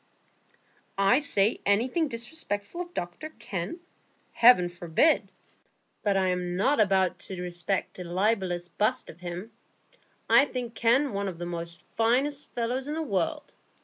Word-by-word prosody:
"I 195 +7 +4
say 220 -7 +2
anything 250 +11 +2
disrespectful 235 - -4
of 350 0 -8
Dr 175 - -5
Kenn? 195 - -5 0.5
Heaven 230 -7 +6
forbid! 175 - +1 0.7
But 200 -2 +1
I 190 -1 +2
am 180 -1 -2
not 215 +1 +3
bound 190 -2 +2
to 190 -2 -8
respect 180 +2 -3
a - - -4
libellous 180 -1 0
bust 220 +7 0
of 160 - -19
him. 180 +5 -6 0.8
I 280 - +6
think 245 -4 -5
Kenn 245 +4 +2
one 200 0 -2
of 180 -3 -5
the 170 -1 -5 0.2
finest 265 +6 +1
fellows 245 +3 -2
in 300 - -3
the 320 - -2
world. 195 - -2
205 Hz, 140 wpm, -27 LUFS, 180-255 Hz, 0.8 s, Heaven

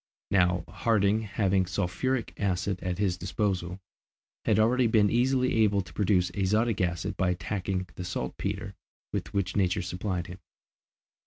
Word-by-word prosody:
Now, 90 -3 +3
Harding 110 -1 +2
having 100 -3 +1
sulphuric 100 +7 -1
acid 95 -1 -1
at 90 -1 -2
his 95 -3 0
disposal, 95 -3 -2 0.7
had 110 -3 +3
already 120 +3 +4
been 105 -2 +4
easily 130 +1 +2
able 105 -3 +3
to 85 -4 -12
produce 90 -1 +2
azotic 105 +4 +1
acid 90 +2 -1
by 95 - +2
attacking 95 +1 -2
the 90 - -6
saltpetre 90 -8 -4 0.4
with - - -3
which 100 -2 -1
nature 90 -2 +1
supplied 90 0 -3
him. 90 +2 -9
95 Hz, 140 wpm, -28 LUFS, 90-105 Hz, 0.7 s, already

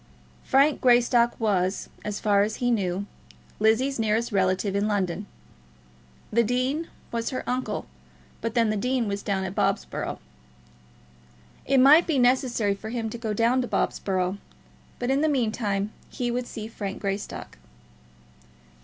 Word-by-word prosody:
Frank 280 +2 +3
Greystock 240 -1 +4
was, 195 -4 0 0.2
as 210 -1 -3
far 205 -2 +3
as 215 +2 0
he 245 -1 0
knew, 195 -3 0 0.5
Lizzie's 230 +5 +2
nearest 225 +2 +1
relative 190 0 +1
in 200 +1 +1
London. 200 -2 -1 1.1
The 235 - +5
dean 255 +8 0 0.2
was 230 -1 -2
her 255 - -5
uncle, 250 -4 -2 0.6
but 230 +1 -3
then 230 -2 +3
the 215 - -1
dean 250 +1 0
was 200 0 -2
down 195 -2 -1
at 190 -1 -4
Bobsborough. - - -1 1.5
It 275 - +3
might 295 +6 +7
be 315 -4 +1
necessary 245 -4 +2
for 210 +2 -8
him 225 -2 -3
to 235 - -6
go 225 -2 -3
down 235 +4 +3
to 250 - -3
Bobsborough; 185 -2 -1 0.6
but 245 +2 -1
in 275 +2 +2
the 310 - +3
meantime 215 -6 0 0.2
he 245 -1 -2
would 245 0 -2
see 215 -1 -6
Frank 200 -3 -5
Greystock. 200 0 -5
225 Hz, 145 wpm, -26 LUFS, 200-250 Hz, 1.5 s, might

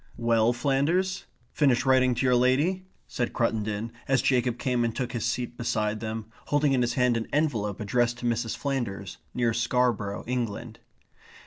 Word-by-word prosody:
"Well, 115 -1 +3
Flanders, 155 +10 0 0.3
finished 135 -4 +2
writing 130 -1 +4
to 130 - 0
your 125 - +4
lady?" 145 +10 +2 0.2
said 120 -2 -2
Cruttendon, 110 -1 -1 0.2
as 135 -1 +2
Jacob 125 -2 +2
came 125 -2 0
and 115 -1 -1
took 125 -2 -2
his 120 -2 -2
seat 120 0 -2
beside 110 -2 -1
them, 110 0 -4 0.2
holding 145 -1 +2
in 130 - +2
his 120 -1 +1
hand 125 -2 +3
an 115 - -3
envelope 115 -10 0
addressed 120 +3 +1
to 120 - -7
Mrs. 115 -1 -1
Flanders, 115 -9 -3 0.2
near 120 -2 +1
Scarborough, 115 -3 0
England. 120 -1 -3
120 Hz, 160 wpm, -27 LUFS, 115-130 Hz, 0.3 s, writing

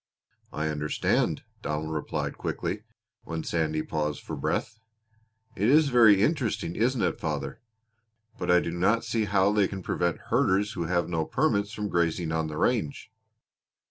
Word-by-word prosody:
"I 75 +2 -2
understand," 75 -1 0 0.2
Donald 75 +1 -3
replied 75 - -3
quickly, - - -3 0.4
when 80 0 -4
Sandy 80 -2 -1
paused 75 -1 -2
for - - -5
breath. 110 0 -2 0.8
"It 105 +4 +1
is 150 +1 +5
very 110 -6 +6
interesting 110 - 0
isn't 120 +2 +1
it, - - 0
father? - - -3 0.8
But - - -3
I 90 0 +6
do 85 - -3
not 100 +7 +1
see 110 -2 0
how 100 0 +3
they 105 -2 +3
can 95 -2 -7
prevent 85 -1 0
herders 100 +3 +2
who 85 -2 -3
have 85 0 0
no 80 -2 0
permits 100 - 0
from 105 -2 -3
grazing 85 -2 0
on 80 0 0
the 75 -1 -6
range." 120 - 0
95 Hz, 155 wpm, -27 LUFS, 80-110 Hz, 0.8 s, very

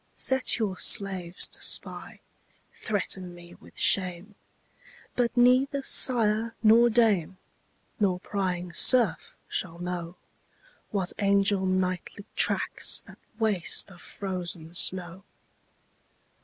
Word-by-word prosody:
Set 265 0 +1
your 200 -5 -3
slaves 185 -3 +2
to - - -5
spy; - - -3 0.5
threaten 185 -4 -3
me 175 0 -14
with - - -19
shame: 185 +1 +1 0.8
But 245 0 -1
neither 260 +3 +3
sire 225 -4 +2
nor 230 +2 +6
dame, 210 -6 +2 0.6
nor 190 -4 +1
prying 180 -3 -4
serf 235 -8 +2
shall 170 -3 -4
know, 175 -1 -5 0.7
What 190 -3 -2
angel 200 -1 +2
nightly 185 +1 -2
tracks - - +1
that - - -16 0.2
waste 210 -4 0
of 175 - -15
frozen 175 -4 -6
snow. 180 +1 -2
190 Hz, 100 wpm, -27 LUFS, 180-220 Hz, 0.8 s, nor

